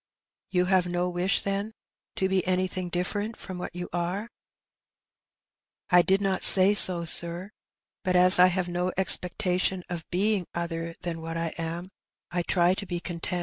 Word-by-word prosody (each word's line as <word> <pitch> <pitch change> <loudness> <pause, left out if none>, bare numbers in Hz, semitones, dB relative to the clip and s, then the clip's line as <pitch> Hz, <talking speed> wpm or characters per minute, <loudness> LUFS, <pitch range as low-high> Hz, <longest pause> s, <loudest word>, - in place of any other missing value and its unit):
" - - -67
You 180 -1 0
have 185 -1 +1
no 175 0 -2
wish, 180 +2 -1
then, 200 +2 -4 0.4
to 190 - -1
be 190 -1 -1
anything 185 -1 -2
different 205 +5 -4
from 185 -2 -9
what 175 - -8
you 180 0 -6
are? 180 +6 -4 0.8
" - - -67
"I 180 0 +6
did 190 +3 +1
not 195 -1 -1
say 190 +1 +7
so, 180 -4 +5
sir; 170 +4 +1 0.5
but 185 -1 -1
as 180 0 +8
I 180 - +7
have 180 0 -2
no 180 +1 -3
expectation 180 0 0
of 170 -2 -7
being 195 0 -1
other 165 -1 -5
than 165 -2 -6
what 165 0 -6
I 165 0 -3
am, 170 +3 -6 0.4
I 175 0 -2
try 175 +1 +1
to 200 +1 -6
be 175 -1 -4
content. 175 0 -3
180 Hz, 175 wpm, -25 LUFS, 175-190 Hz, 0.8 s, as